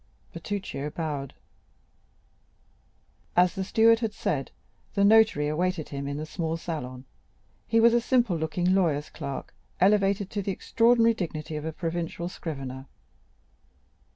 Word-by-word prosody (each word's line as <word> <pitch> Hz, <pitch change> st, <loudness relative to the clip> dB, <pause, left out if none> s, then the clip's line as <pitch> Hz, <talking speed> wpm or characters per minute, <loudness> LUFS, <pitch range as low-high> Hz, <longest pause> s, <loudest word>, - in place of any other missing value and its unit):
Bertuccio 190 Hz, -8 st, -4 dB
bowed. 150 Hz, -4 st, -4 dB, 2.0 s
As 180 Hz, 0 st, +4 dB
the 195 Hz, -, -3 dB
steward 225 Hz, +3 st, +4 dB
had 225 Hz, -3 st, -2 dB
said, 145 Hz, -, -2 dB, 0.5 s
the 200 Hz, -, +3 dB
notary 220 Hz, -8 st, +5 dB
awaited 170 Hz, +1 st, -1 dB
him 140 Hz, -1 st, -5 dB
in 140 Hz, 0 st, -3 dB
the 155 Hz, -, -4 dB
small 160 Hz, 0 st, -3 dB
salon. 130 Hz, -7 st, -6 dB, 0.6 s
He 230 Hz, -, +3 dB
was 230 Hz, +1 st, +6 dB
a 240 Hz, -, +3 dB
simple 240 Hz, -6 st, +2 dB
looking 165 Hz, +3 st, 0 dB
lawyer's 155 Hz, -6 st, +1 dB
clerk, 140 Hz, -1 st, -6 dB, 0.3 s
elevated 195 Hz, 0 st, +3 dB
to 205 Hz, -, -2 dB
the 195 Hz, -, -2 dB
extraordinary 230 Hz, +3 st, +3 dB
dignity 160 Hz, -6 st, -5 dB
of 150 Hz, 0 st, -4 dB
a 160 Hz, -, -2 dB
provincial 170 Hz, +1 st, -3 dB
scrivener. 135 Hz, -6 st, -6 dB
175 Hz, 130 wpm, -27 LUFS, 150-205 Hz, 2.0 s, was